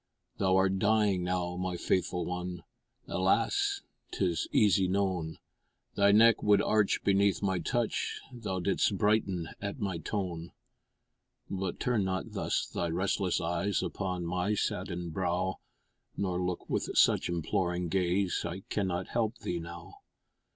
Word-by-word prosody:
Thou'rt 95 0 +3
dying 105 -3 +3
now, 90 -1 -1
my 90 -1 -2
faithful 90 0 0
one, 90 -1 -4 0.4
Alas! 400 - +1 0.3
'tis - - 0
easy 95 -3 +4
known 90 -4 -1 0.6
Thy 100 0 +4
neck 115 +2 +6
would 105 -1 +5
arch 105 0 +2
beneath 100 0 +3
my 95 -2 +1
touch, 120 +6 -1
Thou'dst 100 -3 0
brighten 95 -4 +1
at 100 +5 -4
my 95 -6 -2
tone; 85 -2 -4 1.0
But 95 -2 -3
turn 120 -5 +1
not 95 0 -2
thus - - -1
thy 85 - -3
restless 90 +2 0
eyes 85 +4 0
Upon 90 -3 -3
my 90 +4 0
saddened 85 -4 -2
brow, 90 +1 -1 0.6
Nor 90 -2 -1
look 90 -1 -3
with - - -1
such - - +4
imploring 85 +1 -1
gaze 90 +1 +1
I 85 +2 -4
cannot 95 -3 -1
help 115 0 0
thee 85 - -3
now. 85 +2 -9
95 Hz, 130 wpm, -30 LUFS, 90-100 Hz, 1.0 s, neck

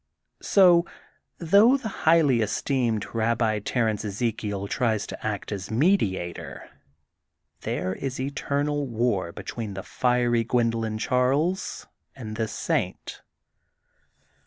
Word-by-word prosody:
So, 180 -4 +5 0.5
though 200 +10 +5
the 260 -5 -6 0.2
highly 150 -8 +4
esteemed 110 +1 0
Babbi 115 -1 +1
Ter 120 0 0
ence 105 -2 -2
Ezekiel 105 -2 -3
tries 110 -3 0
to - - -9
act 105 -1 -4
as 100 -3 -5
mediator, 110 - 0 0.9
there 95 - -2
is 135 +5 -5
eternal 140 +1 -1
war 115 -7 -1
between 105 +2 -6
the 95 - -5
fiery 120 -2 +1
Gwendolyn 115 -2 0
Charles 135 - 0 0.3
and 110 -5 -7
this 110 0 -2
saint. - - -3
115 Hz, 110 wpm, -25 LUFS, 110-140 Hz, 0.9 s, So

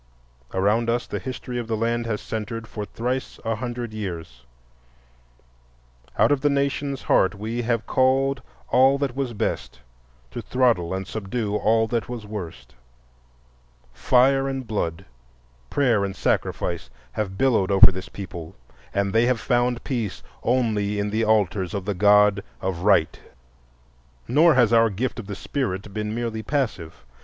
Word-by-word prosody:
Around 105 +5 +1
us 120 +1 0
the - - -4
history 125 -1 -5
of 120 - -5
the 110 -1 -1
land 115 +1 -1
has 105 -2 -2
centred 110 +1 -5
for 105 -2 -5
thrice 125 +5 -3
a 115 0 0
hundred 120 -1 -5
years; 80 - -6 1.7
out - - +4
of 145 -2 +2
the 145 - +3
nation's 140 0 -1
heart 95 - +3
we 110 +4 -3
have 115 -1 -1
called 135 +1 +2 0.3
all 135 +2 +5
that 140 -3 -2
was 135 -3 -2
best 80 - -3 0.5
to - - -5
throttle 120 -10 +1
and 95 0 -3
subdue 105 +1 -3
all 110 +1 +3
that 120 0 -1
was 120 -3 -6
worst; 100 -6 -7 1.2
fire 135 - +3
and 135 -1 -4
blood, 95 -5 -3 0.6
prayer 120 -8 +2
and 95 -1 -3
sacrifice, - - -1 0.2
have 95 +3 -3
billowed 125 -8 +2
over 95 -1 +8
this 95 +1 -7
people, 85 -5 -8 0.4
and 100 -1 0
they 115 +2 +4
have 125 -2 +1
found 120 0 +1
peace 115 -8 -3 0.2
only 110 -4 +1
in 100 0 -1
the 110 +2 +1
altars 105 -4 +1
of 100 -2 -3
the 105 - -1
God 105 +1 +5 0.2
of 95 -2 -3
Right. 85 -5 +3 1.1
Nor 150 +5 +5
has 120 -3 +4
our 115 0 +5
gift 115 +5 -3
of 105 - -8
the 100 - -5
Spirit 100 -5 -3
been 105 +1 -3
merely 115 -2 -3
passive. 110 - -3
110 Hz, 150 wpm, -24 LUFS, 100-125 Hz, 1.7 s, over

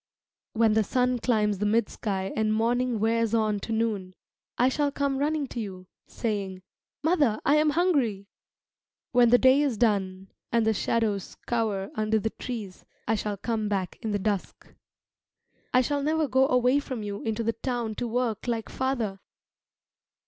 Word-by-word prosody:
When 225 -1 +3
the 220 0 +3
sun 250 +3 +1
climbs 210 -5 +1
the 210 - 0
mid 225 +1 +2
sky 195 -3 -3
and 220 -1 +1
morning 235 +2 +1
wears 225 +1 +1
on 215 -2 +1
to 225 - -6
noon, 215 -5 -1 0.4
I 250 - +4
shall 285 +2 +1
come 280 -1 -1
running 300 +1 0
to 240 - -5
you, 190 -4 -6 0.2
saying, 195 -5 -3 0.4
"Mother, 290 -9 +2
I 290 - +5
am 305 0 +4
hungry!" 285 - +1 0.9
When 245 -1 +5
the 245 - +7
day 260 +3 +5
is 275 -6 0
done 195 -4 0 0.2
and 230 -1 +2
the 220 - +3
shadows 210 -2 -1
cower 215 -4 -1
under 215 0 +1
the 220 +1 -1
trees, 215 -7 -7 0.2
I 225 - +2
shall 210 -1 -2
come 220 0 -2
back 190 -3 -2
in 225 - -3
the 205 - +1
dusk. 205 -1 -3 1.0
I 255 - +5
shall 285 +3 -1
never 310 +1 +1
go 265 +1 +3
away 250 +1 +3
from 255 -6 -5
you 205 -1 -5
into 225 +1 -2
the 230 +1 0
town 235 -2 -3
to 245 - -2
work 235 -2 -1
like 230 -2 -2
father. 240 -7 -2
225 Hz, 170 wpm, -27 LUFS, 210-255 Hz, 1.0 s, the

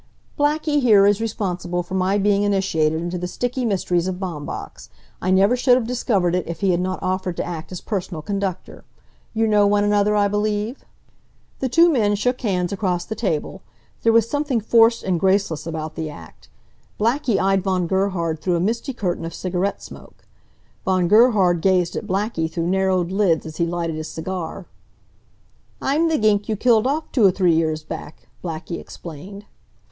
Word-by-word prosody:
"Blackie 295 0 +1
here 210 -6 +6
is 205 +1 +3
responsible 180 -5 -2
for 175 - -10
my 190 +1 +1
being 205 0 +2
initiated 190 -6 +1
into 175 +1 -3
the 180 - -3
sticky 245 +7 -2
mysteries 180 -4 0
of 185 - -2
Baumbach's. 170 -6 -6 0.3
I 185 - -1
never 195 +5 +4
should 250 0 +4
have 250 -2 0
discovered 215 -7 0
it 180 -1 -1
if 165 -1 -6
he 195 -2 +3
had 175 - +1
not 185 +1 -2
offered 185 -1 -2
to - - -1
act 165 -1 -6
as 180 - -6
personal 180 -6 -4
conductor. 195 0 -4 0.5
You 225 0 +2
know 210 -2 +4
one 205 0 +2
another, 205 0 +2
I 205 -1 +3
believe?" 210 +4 -2 0.8
The 260 - -1
two 335 +7 +5
men 210 -5 +2
shook 250 +5 -1
hands 180 -5 -1
across 185 -3 -1
the - - -4
table. 195 -3 -3 0.4
There 230 - +4
was 230 -1 +4
something 290 -2 0
forced 230 +1 +4
and 180 -3 0
graceless 190 -4 +1
about 155 -1 -4
the 160 -1 -4
act. 150 - -13 0.5
Blackie 230 -1 +1
eyed 195 0 +2
Von 185 -2 0
Gerhard 170 -4 -1
through 175 +2 0
a - - 0
misty 230 - -1
curtain 180 -8 -2
of 165 0 -6
cigarette 185 +2 -2
smoke. - - -13 0.6
Von 185 -2 +1
Gerhard 205 -6 +4
gazed 180 -2 +2
at - - -4
Blackie 190 -4 -1
through 165 0 -2
narrowed 185 -2 +1
lids 190 -5 +1
as 155 -1 -8
he 170 - +1
lighted 170 -1 -2
his 155 0 -5
cigar. 180 +1 -5 1.1
"I'm 310 +5 +1
th' 320 - +1
gink 210 -1 +2
you 220 - +1
killed 230 +1 +3
off 305 +4 -2
two 240 - +2
or 195 - +8
three 180 -2 +2
years 160 -1 0
back," 155 - -9 0.2
Blackie 170 0 -5
explained. 185 +6 -10
190 Hz, 180 wpm, -21 LUFS, 175-215 Hz, 1.1 s, or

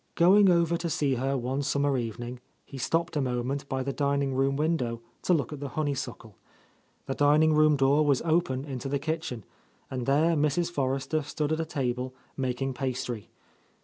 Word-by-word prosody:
Going 195 +3 +6
over 170 -1 +3
to 170 0 -3
see 145 -3 +1
her 135 +2 0
one 130 +3 -2
summer 140 0 +1
evening, 120 +1 -4 0.3
he 135 - -9
stopped 165 +6 0
a 145 - +1
moment 130 +2 -2
by 130 0 -1
the 140 +1 -3
dining 140 -1 0
room 135 +1 +1
window 145 -6 0 0.2
to - - 0
look 150 0 -2
at 145 - -7
the 140 0 -5
honeysuckle. 135 -7 -3 0.7
The 135 - -2
dining 150 +3 +4
room 155 0 +5
door 140 +2 +3
was 140 -3 +2
open 155 -5 +1
into 135 -2 -5
the 140 - +1
kitchen, 150 -6 -3 0.5
and 130 -1 -3
there 155 +5 +3
Mrs. 150 +3 +1
Forrester 135 +1 -1
stood 150 +1 -3
at 160 - 0
a 165 - -1
table, 130 -4 -2 0.2
making 130 0 -2
pastry. 125 -4 -4
140 Hz, 180 wpm, -28 LUFS, 130-155 Hz, 0.7 s, Going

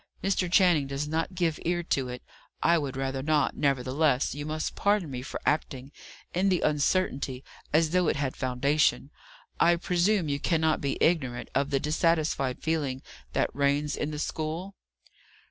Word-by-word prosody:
Mr. 185 -2 0
Channing 175 -7 +4
does 140 +2 -3
not 165 +4 -2
give 170 -3 0
ear 175 +1 0
to 135 -5 -1
it; 125 0 -7 0.4
I 170 - +5
would 135 -3 -4
rather 135 0 -2
not; 150 +1 +1
nevertheless, 140 0 +1
you 145 +1 -5
must 155 0 -3
pardon 200 -7 +1
me 125 -1 -4
for 130 - -6
acting, 135 -3 -1 0.4
in 190 +3 +2
the 180 -2 +1
uncertainty, 145 -3 0 0.3
as 155 +1 +3
though 180 -1 +2
it - - +2
had 140 -2 -2
foundation. 135 +3 +1 0.5
I 175 +1 +5
presume 180 +1 +1
you 140 -1 -1
cannot 160 0 +1
be 140 -1 -1
ignorant 130 -8 +1
of 140 +1 +1
the 140 -1 +1
dissatisfied 150 -3 0
feeling 145 -5 -1 0.3
that - - 0
reigns 140 +1 +1
in 150 - -2
the 150 - -5
school?" 160 +5 -4
150 Hz, 165 wpm, -28 LUFS, 135-170 Hz, 0.5 s, I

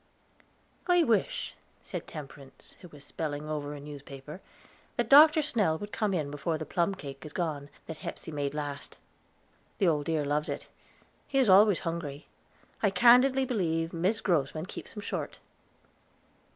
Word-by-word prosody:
"I 355 -1 +5
wish," 255 - 0 0.3
said - - -6
Temperance, 140 -3 -11
who 180 - -10
was 145 -4 -11
spelling 150 -1 -4
over 150 -1 -4
a - - -8
newspaper, 145 +2 -10 0.6
"that 240 -1 0
Dr. 305 +2 +8
Snell 210 - +1
would 205 +4 -8
come 215 -2 0
in 155 -6 -1
before 145 +3 -2
the 155 - -5
plum 175 +5 0
cake 140 -5 -9
is 155 - -9
gone, 150 -5 -3 0.2
that 160 - -7
Hepsey 160 - -7
made 145 -1 -3
last. 145 -1 -5 0.8
The 195 - +2
old 150 -3 +1
dear 160 -3 0
loves 150 +1 -1
it; - - -4 0.6
he 270 - -2
is 255 -7 +5
always 200 0 +6
hungry. 165 -4 -4 0.6
I 205 - +4
candidly 250 +7 +5
believe 165 -9 -1
Mis 185 +7 0
Grossman 155 -2 0
keeps - - -9
him 210 - -7
short." - - -4
165 Hz, 155 wpm, -29 LUFS, 145-210 Hz, 0.8 s, Dr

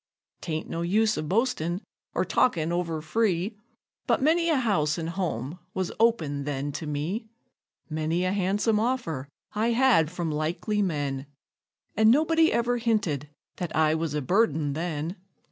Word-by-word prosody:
'Tain't 160 -2 -3
no 165 - -3
use 215 +5 +2
of 155 - -4
boastin', 185 -6 +1 0.4
or - - +1
talkin' 170 -10 +2
over 165 -3 -2
free, 195 +2 0 0.5
But - - +3
many 335 +4 +3
a 320 - +4
house 190 - +1
an' 165 - -3
home 165 - -3 0.2
was 185 -2 -1
open 160 -12 +2
then 145 0 -2
to 150 +2 -5
me; 160 +10 -3 0.6
Many 160 +3 -1
a 185 - +1
han'some 205 +3 +1
offer 215 - -1 0.2
I 225 +3 +1
had 235 - +4
from 170 -2 -3
likely 170 +8 -1
men, 145 -7 -2 0.7
And 220 +1 +5
nobody 320 +5 +4
ever 240 +1 +1
hinted 190 - 0 0.3
that 175 -3 -4
I 155 0 +4
was 160 -2 -1
a 150 - -1
burden 155 - +2
then. 165 +2 -3
175 Hz, 150 wpm, -27 LUFS, 155-220 Hz, 0.7 s, And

